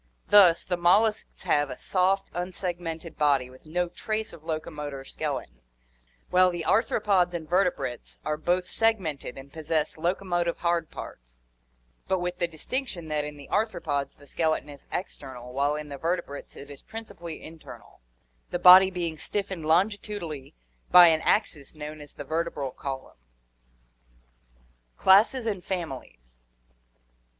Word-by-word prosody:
Thus, 190 -5 +7
the 180 - -1
molluscs 205 +5 +2
have 145 -1 +2
a 125 - -6
soft, 190 +1 +1
unsegmented 175 -2 -4
body 140 -4 +2
with 130 +4 -17
no 175 +3 0
trace 215 +5 -4
of 155 - -13
locomotor 150 -4 -5
skeleton, - - -5 0.7
while 185 0 +6
the 175 -2 -4
arthropods 195 -5 +2
and 160 -2 -5
vertebrates 180 -8 -1
are 150 - 0
both 175 +4 0
segmented 185 - 0
and 135 +1 -11
possess 160 -1 -1
locomotive 175 0 0
hard 170 -2 0
parts, - - -10 0.6
but 190 - +2
with 180 0 -3
the 175 - +2
distinc 255 - -4
tion 170 -7 -7
that 150 -1 0
in 150 0 -6
the 140 - -11
arthropods 145 -10 -1
the 145 - -17
skeleton 155 +1 -1
is 145 -1 -12
external 130 -8 -6
while 140 +2 +1
in 150 0 -6
the 140 -1 -7
vertebrates 165 -3 -3
it 140 +1 -10
is 140 - -11
principally 175 -7 -8
internal, 160 - -12 0.5
the - - -1
body 185 +1 +9
being 170 -3 -3
stiffened 190 -2 -3
longitudinally 175 - -1 0.3
by 175 -1 +9
an 160 -1 +2
axis 155 -9 0
known 150 0 -7
as 145 - -12
the 145 - -7
vertebral 155 -2 -2
column. 135 - -7 1.8
Classes 220 +6 +5
and 200 -5 -2
Families. - - -6
165 Hz, 140 wpm, -27 LUFS, 145-185 Hz, 1.8 s, body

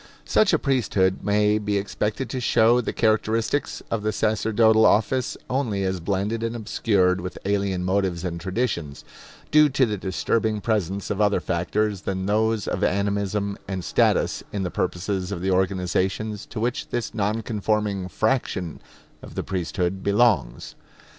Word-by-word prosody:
Such 215 - +3
a 165 - +4
priesthood 105 -10 +1
may 105 +1 +2
be 105 -1 -1
expected 105 +5 -2
to 130 - -2
show 120 0 +4
the - - -3
characteristics 110 +4 0
of 115 - 0
the 110 +1 0
sacerdotal 110 +1 +3
office 120 +5 +2
only 120 -7 -1
as 95 -1 -1
blended 100 +6 -1
and 115 +1 -2
obscured 95 -5 +1
with 90 0 -6
alien 100 -2 0
motives 95 -2 0
and 85 -1 -4
traditions, 95 - -3 0.5
due 150 0 +6
to 130 -1 +3
the 105 -3 -2
disturbing 105 +3 0
presence 100 -3 -1
of 105 0 -1
other 105 -1 +3
factors 100 +3 -1
than 95 -1 -3
those 110 0 +1
of - - -2
animism 100 +1 0
and 95 -2 -4
status - - +2
in 100 -2 -2
the 90 - -3
purposes 90 +1 -2
of 95 - -3
the 95 +1 0
organizations 95 +3 -1
to 115 - -6
which 120 +2 -2
this 120 -2 -3
non 105 +1 -1
conforming 105 -3 -1
fraction 105 - -1 0.4
of - - -11
the - - -2
priesthood 95 0 -2
belongs. 100 - +1
105 Hz, 155 wpm, -24 LUFS, 95-110 Hz, 0.5 s, due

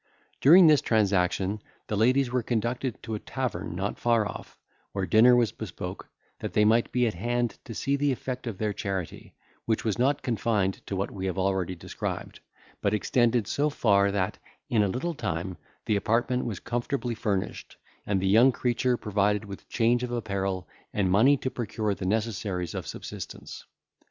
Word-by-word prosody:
During 175 +6 +8
this 150 -4 +6
transaction 100 -1 +1 0.2
the 105 - -3
ladies 125 +4 +3
were 125 0 +1
conducted 120 +2 -2
to 110 - -5
a 105 - -2
tavern 105 -11 -4
not 100 +3 -3
far 115 -3 +2
off, - - -9 0.4
where 95 -1 -1
dinner 120 +5 +6
was 120 -3 +3
bespoke, 90 -2 -7 0.3
that - - -5
they 105 - +4
might 115 +2 +3
be 125 0 +2
at 110 - 0
hand 120 +5 -1
to 115 - -7
see 140 +6 0
the 145 0 +1
effect 130 -1 -4
of 110 -5 -4
their 105 0 -1
charity, 95 -4 -5 0.3
which 110 0 0
was 110 0 0
not 135 +3 +2
confined 105 -5 0
to 100 - -3
what 95 +1 -2
we 95 -1 -4
have 95 - -3
already 95 -1 0
described, 85 - -5 0.4
but 100 +1 +2
extended 120 +1 +2
so 145 +8 0
far, 100 -7 +3
that, 95 -2 -1 0.3
in 110 - +4
a 100 - +3
little 130 - -2
time, 95 - -3 0.3
the 105 - +1
apartment 120 +5 +1
was 105 -6 -4
comfortably 120 +1 -2
furnished, 105 -4 -3 0.3
and 100 -2 0
the 95 - 0
young 115 +7 +6
creature 125 0 0
provided 105 0 0
with 100 -1 -10
change 120 +1 +2
of 125 -1 -3
apparel, 100 -5 -2 0.2
and 95 -3 +1
money 130 +9 +5
to 130 - -3
procure 110 -3 -2
the 95 -1 -4
necessaries 100 -4 -1
of - - -5
subsistence. - - -8
110 Hz, 175 wpm, -27 LUFS, 100-120 Hz, 0.4 s, During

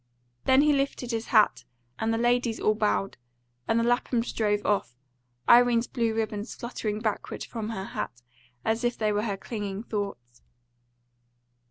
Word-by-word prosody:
Then 265 +2 +6
he 300 -1 +4
lifted 275 -3 -1
his 225 0 -2
hat, 215 -3 +4 0.4
and 225 0 0
the 225 - +1
ladies 240 -1 +1
all 215 - +3
bowed, 210 -4 0 0.5
and 225 - +3
the - - +2
Laphams 240 0 +1
drove 210 -2 0
off, 195 - 0 0.5
Irene's 240 -1 +6
blue 230 -3 -1
ribbons 215 0 -3
fluttering 220 -3 -4
backward 215 -2 -3
from 225 -2 -5
her 190 -4 -4
hat, 120 -8 -5 0.4
as 225 +1 0
if 240 0 0
they 215 -1 +1
were 205 0 +1
her 205 -3 -2
clinging 205 -1 -5
thoughts. 200 - -5
225 Hz, 155 wpm, -27 LUFS, 205-240 Hz, 0.5 s, Then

